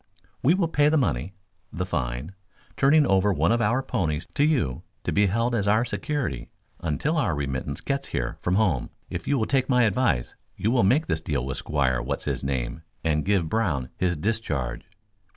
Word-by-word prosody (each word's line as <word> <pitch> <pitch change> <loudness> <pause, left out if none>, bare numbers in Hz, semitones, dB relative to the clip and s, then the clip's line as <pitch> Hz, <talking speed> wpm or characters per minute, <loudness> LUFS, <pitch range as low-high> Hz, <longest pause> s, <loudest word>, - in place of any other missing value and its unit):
"We 155 +7 +4
will 185 -3 +1
pay 150 -2 +3
the 155 - +3
money, 90 - -1 0.4
the 90 - -3
fine, 65 0 -3 0.4
turning 145 +2 +5
over 95 -1 +3
one 80 +2 +2
of 120 0 +2
our 120 +4 +2
ponies 80 - -1
to 145 - +2
you 125 - +1 0.2
to - - -1
be 105 0 +3
held 115 +5 0
as 105 -4 0 0.2
security 125 - -3 0.3
until 85 - -1
our 95 - +1
remittance 70 0 -3
gets 140 0 -2
here - - -3
from 90 - +1
home. 95 - +1 0.2
If - - -5
you 140 - +2
will 110 - +1
take 130 +1 +1
my 125 -2 +4
advice 105 - +1 0.2
you 110 - 0
will 125 -1 +3
make 130 +12 +3
this 80 - -1
deal 70 -6 -2
with 65 -1 -3
Squire 65 -4 0
What's - - -3
His - - -2
Name 65 +1 -2 0.2
and 75 -2 +1
give 95 -4 +1
Brown 80 - 0
his 90 -2 0
discharge." 75 - -2
95 Hz, 190 wpm, -25 LUFS, -, 0.4 s, turning